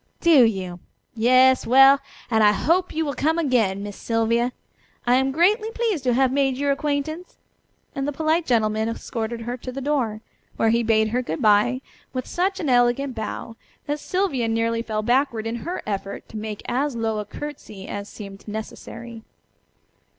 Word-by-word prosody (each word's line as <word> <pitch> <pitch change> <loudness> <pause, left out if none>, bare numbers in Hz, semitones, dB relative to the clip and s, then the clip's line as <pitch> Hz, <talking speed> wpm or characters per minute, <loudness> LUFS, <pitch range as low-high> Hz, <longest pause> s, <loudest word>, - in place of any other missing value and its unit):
"Do 315 -8 +6
you? 185 -5 -2 0.3
Yes! 255 +3 +4
Well! 270 +3 +7 0.3
And 220 -1 +4
I 210 0 +6
hope 350 - +1
you 320 0 -1
will 285 - -2
come 315 +5 +1
again, 230 - +1
Miss 205 -1 -6
Sylvia. 230 +2 0 0.5
I 245 - +3
am 265 +1 +3
greatly 410 - +2
pleased 450 - -1
to 245 -2 +2
have 260 0 +3
made 270 -1 +1
your 285 +1 +1
acquaintance," 295 +4 -3 0.6
and 275 -1 -3
the - - 0
polite 315 +3 0
gentleman 220 -2 +1
escorted 230 0 -4
her 240 +2 -4
to 255 +1 -7
the 265 - -5
door, 255 -7 -1 0.4
where 225 - +3
he 235 +1 +2
bade 220 -1 +2
her 245 +3 0
good 165 -10 -4
bye 215 +5 +4 0.3
with 255 -1 -3
such 380 +2 -1
an 310 - -2
elegant 245 +2 +2
bow 225 0 -5 0.3
that 295 +1 -2
Sylvia 345 -10 -1
nearly 230 0 0
fell 215 -2 -3
backward 240 -1 +1
in 225 +1 -2
her 350 +9 -5
effort 200 -1 -4
to - - -12
make 215 -1 -5
as 270 +2 -1
low 225 -2 -1
a 210 - -4
curtsey 215 -6 -8
as 205 0 -6
seemed 200 -1 -10
necessary. 225 +2 -7
245 Hz, 175 wpm, -23 LUFS, 220-285 Hz, 0.6 s, Well